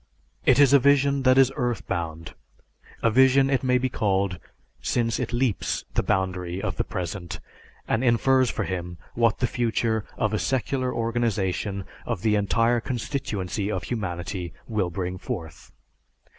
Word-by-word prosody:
It - - +6
is 140 -1 +6
a 140 - +8
vision 140 +1 +3
that 130 - +5
is 135 -1 +6
earth 120 -1 -2
bound; 80 -1 -4 0.7
a 115 - +4
vision 130 +3 +5
it 135 - +2
may 125 -1 +3
be 130 +1 0
called, 95 -6 0 0.4
since 115 -2 0
it 125 -2 -2
leaps 120 -3 -1
the - - +2
boundary 90 -1 -1
of 95 -4 -3
the - - +1
present 90 -2 -5 0.5
and 115 - +1
infers 130 +1 +3
for - - -2
him 90 -1 -4 0.2
what 115 -1 +2
the 125 - +1
future 115 -2 0
of 110 -1 0
a 110 - +1
secular 130 0 -1
organization 105 -5 -1 0.2
of 115 -6 -3
the 110 -1 +3
entire 115 +4 +2
constituency 110 -6 -3
of - - -2
humanity 90 -5 -4
will 105 -6 0
bring 90 +1 -4
forth. 80 -4 -7
110 Hz, 155 wpm, -25 LUFS, 95-125 Hz, 0.7 s, a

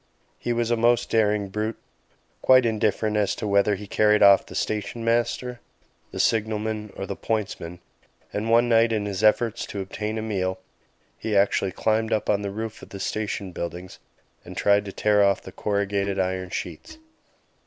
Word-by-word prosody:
He 120 - -2
was 120 0 0
a - - +4
most 120 +1 +2
daring 105 -2 +2
brute, 105 +3 -3 0.6
quite 130 -1 +6
indifferent 110 -1 0
as 105 -2 +1
to - - -5
whether 100 0 +3
he 105 +2 -8
carried 105 +1 +3
off 100 -1 +7
the - - -10
station 110 +2 -3
master, 120 +1 0 0.5
the - - -7
signalman, 110 -1 0
or 95 - -4
the - - -5
pointsman; 95 -6 -3 0.6
and 105 +2 -2
one 115 +1 +4
night, 115 0 +4
in 105 -2 0
his 100 0 -3
efforts 110 +1 +3
to 100 - -6
obtain 105 +3 -4
a 110 - -3
meal, 95 -4 -2 0.6
he 110 -2 0
actually 100 -1 +2
climbed 110 +3 0
up 110 - +1
on 100 - +1
to - - -6
the - - -4
roof 110 +1 -6
of - - -12
the 100 - -8
station 100 -1 -3
buildings 85 +1 -6 0.4
and - - -10
tried 100 0 +3
to 100 - -6
tear 105 +1 +3
off 100 -1 +2
the - - -9
corrugated 100 -1 -1
iron 95 -1 -1
sheets. 315 - -6
105 Hz, 180 wpm, -24 LUFS, 100-110 Hz, 0.6 s, off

